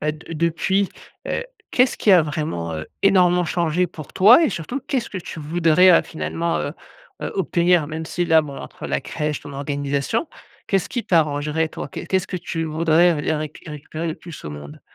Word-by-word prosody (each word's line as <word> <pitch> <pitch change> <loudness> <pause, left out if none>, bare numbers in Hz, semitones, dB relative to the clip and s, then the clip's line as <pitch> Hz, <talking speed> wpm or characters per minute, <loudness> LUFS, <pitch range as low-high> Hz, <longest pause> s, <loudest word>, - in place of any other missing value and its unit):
bah, 150 - 0
de 155 +2 -10
depuis, 170 +4 +1 0.4
heu, - - -2 0.3
qu'est-ce 250 +1 +3
qui 210 - +2
a 185 - +8
vraiment, 150 - -3
heu, 80 0 -5 0.2
énormément 180 -2 +4
changé 170 +1 +1
pour 155 -4 -11
toi 225 - +7
et - - +3
surtout, 205 - -4
qu'est-ce 260 -4 -1
que 190 - -5
tu 170 - -8
voudrais, 165 +3 +4
heu, - - +3
finalement, 165 +1 -2
heu, 145 - -3 0.5
heu, - - -3
obtenir? 175 -4 +2
Même 160 +1 -5
si 175 +1 -1
là, 160 -1 +5
bon 140 -2 -8
entre - - -8
la - - -1
crèche, 150 -1 -3
ton 145 - -10
organisation 140 - -2 0.4
qu'est-ce 195 -2 0
qui 240 - -3
t'arrangerait 155 -1 +1
toi, - - -7
qu'est - - -7
qu'est-ce 190 0 0
que 185 - -3
tu 165 -1 -4
voudrais 160 0 +3
et - - +1
réc 155 -1 -4
récupérer 155 +2 -6
le 160 - -2
plus 165 -4 -11
au 75 - -5
monde? 75 0 -9
160 Hz, 195 wpm, -22 LUFS, 150-180 Hz, 0.5 s, a